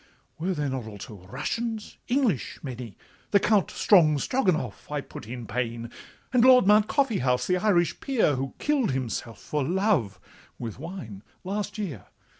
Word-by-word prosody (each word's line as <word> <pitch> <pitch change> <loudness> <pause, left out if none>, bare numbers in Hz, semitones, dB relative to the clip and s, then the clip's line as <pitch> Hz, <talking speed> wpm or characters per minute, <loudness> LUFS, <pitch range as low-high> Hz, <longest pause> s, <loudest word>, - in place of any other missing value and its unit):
Were 180 +3 -1
there 150 -2 -1
not 130 -4 -3
also 100 -2 -10
Russians, 220 - -4
English, 245 - +1
many? 125 -6 -7 0.3
The 200 - +5
Count 210 -1 +3
Strongstroganoff 175 - +2
I 150 - 0
put 105 - -10
in 120 0 -6
pain, 115 +1 -3 0.4
And 245 -2 +5
Lord 255 -3 +7
Mount 210 +1 +5
Coffeehouse, 130 - +1
the 180 - +2
Irish 180 -3 +2
peer, 250 - +2
Who 135 0 -3
kill'd 280 - +1
himself 120 -3 -3
for 150 -2 -2
love 170 - +1 0.4
(with 115 -1 -6
wine) 140 - -7 0.2
last 200 +3 -3
year. 165 - -5
155 Hz, 145 wpm, -26 LUFS, -, 0.4 s, Lord